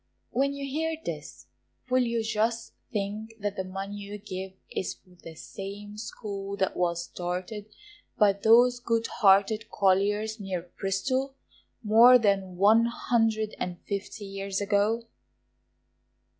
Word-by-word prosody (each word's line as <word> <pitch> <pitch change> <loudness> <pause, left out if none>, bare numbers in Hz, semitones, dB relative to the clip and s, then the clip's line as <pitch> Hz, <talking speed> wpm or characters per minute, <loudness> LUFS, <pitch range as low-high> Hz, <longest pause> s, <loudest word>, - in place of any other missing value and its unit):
When 275 +2 +1
you 280 0 -4
hear 320 +4 -1
this 145 - -6 0.4
will 255 0 +3
you 235 -2 0
just 225 +1 -1 0.2
think, 215 +1 -3
that 205 -1 -2
the 190 - -2
money 195 +2 -6
you 205 0 -7
give 190 -2 -6 0.2
is 190 - -3
for 185 - -26
the 165 - -10
same 200 +4 -8
school 200 -3 -6
that 190 - 0
was 170 -1 0
started 180 +5 -5 0.5
by 205 -2 +5
those 235 +5 +5
good 230 -2 0
hearted 210 +3 +4
colliers 205 +3 +1
near 180 -3 -5
Bristol, 260 +8 -1 0.5
more 230 +4 +8
than 195 -5 +1
one 215 +4 +6
hundred 225 -2 0
and 175 -1 -3
fifty 200 +1 -4
years 195 0 -3
ago. 205 +3 +1
205 Hz, 130 wpm, -28 LUFS, 195-230 Hz, 0.5 s, more